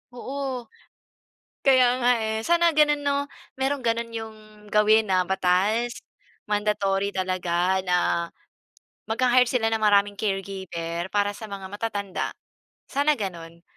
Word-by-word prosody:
Oo. 265 0 -4 1.0
Kaya 255 -2 +5
nga, 245 0 +4
eh. 220 0 -1
Sana 340 +1 +3
ganun 295 -1 +4
'no, 280 0 +1 0.3
merong 270 +1 -1
gano'n 230 0 -1
yung 220 -1 -6 0.3
gawin 215 +1 +4
na 185 -1 +2
batas, 190 +6 +1 0.5
mandatory 205 -2 0
talaga 185 0 0
na, 180 -1 +2 1.1
magha-hire 250 +2 +3
sila 225 -3 +1
ng 220 - 0
maraming 205 -1 +3
caregiver 190 -4 -3
para 205 0 +1
sa 220 - -8
mga 200 -1 -7
matatanda, 205 -3 -3 0.6
sana 290 +2 +2
gano'n. 170 -4 -6
210 Hz, 120 wpm, -25 LUFS, 190-245 Hz, 1.1 s, Kaya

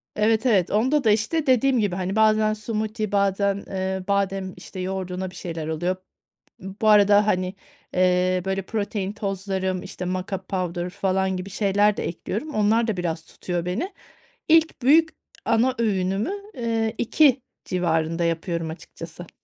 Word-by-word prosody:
Evet, 220 +3 +2
evet, 195 -7 +3
onda 260 +7 +2
da, 220 - +4
işte 255 +9 0
dediğim 260 0 +4
gibi, 200 -4 0
hani, 190 +2 -2
bazen 215 0 +4
smoothie 215 0 -3
bazen, 200 0 +1
eee, 190 0 -3
badem, 195 -1 0
işte, 185 - -9
yoğurduna 185 0 -3
bir - - -15
şeyler 165 -3 -5
oluyor. 175 +4 -1 0.7
B 190 +1 -8
bu 215 - +4
arada, 205 0 +6
hani, 185 -1 0 0.4
eee, 180 0 +2
böyle 190 0 -1
protein 200 -1 -3
tozlarım, 190 -2 -2
işte 185 -1 -7
mocka 185 +1 -3
powder 180 -2 -3
falan 190 0 0
gibi 185 +2 -6
şeyler 205 +1 +2
de - - -3
ekliyorum. 220 - -4
Onlar 215 +2 +3
da 220 -4 -1
biraz 165 -2 -3
tutuyor 175 -2 -4
beni. 330 - -3 0.5
İlk 320 -2 +4
büyük 320 +5 +5 0.4
ana 235 +3 +2
öğünümü, 195 - 0 0.2
eee, 225 - -1
14.00 265 +1 +4 0.2
civarında 165 -1 0
yapıyorum 165 0 -1
açıkçası. 165 +1 -10
195 Hz, 150 wpm, -24 LUFS, 185-220 Hz, 0.7 s, arada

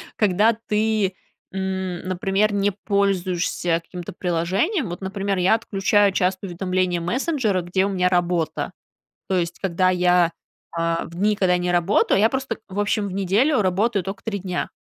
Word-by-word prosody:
когда 210 +2 +3
ты, 215 -2 +1 0.4
м, 190 -2 -3
например, 195 +3 +1
не 200 0 +1
пользуешься 185 -4 0
каким-то 180 +2 -8
приложением. 185 - 0
Вот, 175 - -6
например, 195 +1 -2
я 185 +4 +4
отключаю 205 -2 +2
часто 185 +1 0
уведомления 180 0 -1
мессенджера, 235 - 0
где 180 +2 0
у - - -1
меня 180 -2 +1
работа. 175 -2 0 0.6
То 190 - +1
есть, 175 -1 -2
когда 185 -1 +1
я, 180 -1 +3 0.4
а, 165 0 -1
в 170 - -11
дни, 210 +4 +2
когда 185 -3 +2
я - - +3
не 175 0 -1
работаю, 175 +3 +2
я 220 +2 +5
просто, 265 -3 -3
в 190 +1 -5
общем, 205 0 0
в - - -6
неделю 210 - +2
работаю 200 +2 +1
тока 195 +4 -6
3 210 -3 -3
дня. 180 -1 -3
190 Hz, 160 wpm, -22 LUFS, 180-205 Hz, 0.6 s, я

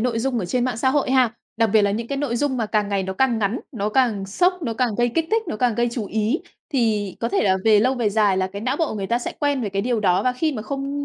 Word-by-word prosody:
nội 235 -1 0
dung 250 +1 -1
ở 205 - -2
trên 245 +7 0
mạng 250 -3 -1
xã 260 +3 +1
hội 280 -2 +1
ha, 255 -4 +3 0.2
đặc 225 -3 +2
biệt 215 -1 +5
là 200 - +2
những 225 +3 -3
cái 280 - -2
nội 270 -5 -1
dung 265 0 0
mà 225 - -1
càng 210 -1 0
ngày 200 -1 0
nó 190 0 -3
càng 240 +2 +1
ngắn, 215 +3 -1
nó 210 -4 -2
càng 215 -4 +1
sốc, 360 - +1
nó 230 -6 -2
càng 235 -1 0
gây 240 0 +3
kích 320 +7 -1
thích, 445 0 +2
nó 215 - -3
càng 240 0 +1
gây 240 +2 +1
chú 225 -5 -3
ý, 220 +8 0 0.3
thì 215 -7 0
có 230 - 0
thể - - +1
là 190 -2 +3
về 215 -2 +5
lâu 255 +4 +2
về 240 -4 0
dài 205 -2 +2
là 185 0 +1
cái 200 +2 -7
não 255 +4 0
bộ 325 - +1
của - - -5
người 195 -2 -3
ta 235 - +1
sẽ 245 - -5
quen 285 -2 +1
về 220 - -2
cái 195 0 -2
điều 240 -1 0
đó. 185 -3 +2
Và 255 - +1
khi 305 +5 -1
mà 220 -6 -5
không 275 +4 -4
235 Hz, 320 wpm, -22 LUFS, 210-260 Hz, 0.3 s, biệt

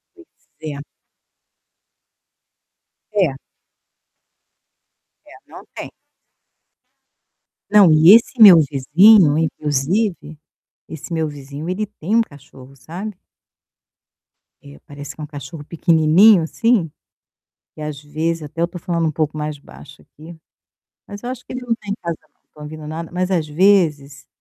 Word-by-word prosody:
Pois 350 -1 -19 0.3
é. 150 -2 -7 2.3
É. 185 -9 +1 1.9
É, - - -18 0.2
não - - -14
tem. - - -8 1.8
Não, 200 -5 +6
e 160 +6 +7
esse 235 +1 0
meu 190 -6 +10
vizinho, 150 +4 +4
inclusive, 155 +3 -2 0.5
esse 160 +2 -10
meu 160 -1 -1
vizinho 145 +1 -9
ele 195 +4 -3
tem 205 -1 -5
um 230 - +4
cachorro, 140 - -10
sabe. 175 +10 -8 1.5
É, 70 0 -15
parece 145 0 -10
que - - -11
é - - -5
um - - -7
cachorro 145 +1 -10
pequenininho, 170 +4 +3
assim, 200 -1 0 0.9
e 155 - -10
às 150 -2 -6
vezes 160 +3 -3
até 150 +2 -10
eu 170 - +1
tô 180 0 -10
falando 170 -1 -2
um - - -1
pouco 155 0 -3
mais 150 -1 -5
baixo 140 0 -16
aqui, 160 +3 -15 0.7
mas 205 0 -10
eu 245 - -5
acho 255 -1 -8
que - - -10
ele 255 - -5
não 240 -2 -1
tá 210 -3 -17
em 200 - -1
casa, 170 -2 -4 0.2
não - - -48
tô 150 - -17
ouvindo 155 0 -9
nada. 165 +1 -7
Mas, 180 +1 -2
às 170 -4 -1
vezes, 150 -4 +1
160 Hz, 140 wpm, -18 LUFS, 150-195 Hz, 2.3 s, meu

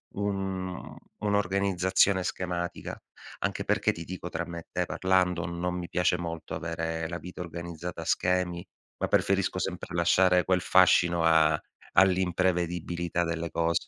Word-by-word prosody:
un 95 -2 -3 0.2
un'organizzazione 100 -2 +2
schematica. 90 -1 -4 0.4
Anche - - -2
perché, - - +2
ti 85 - -8
dico, 90 0 -6
tra 85 0 -3
me 85 0 -6
e - - -10
te - - 0
parlando, 90 -2 +1
non 90 +1 -3
mi 85 -1 -5
piace 90 0 +2
molto 85 -2 -5
avere 80 0 -3
la 85 - -3
vita 90 0 -8
organizzata 85 0 -6
a - - -7
schemi, 90 -1 0 0.4
ma - - +1
preferisco 95 -1 +2
sempre 90 -1 -4
lasciare 90 +1 +4
quel 90 -1 +2
fascino 85 -2 +4
a 80 -1 +4 0.3
all'imprevedibilità 90 -2 +1
delle 85 0 -3
cose. 85 0 0
90 Hz, 140 wpm, -28 LUFS, 85-95 Hz, 0.4 s, lasciare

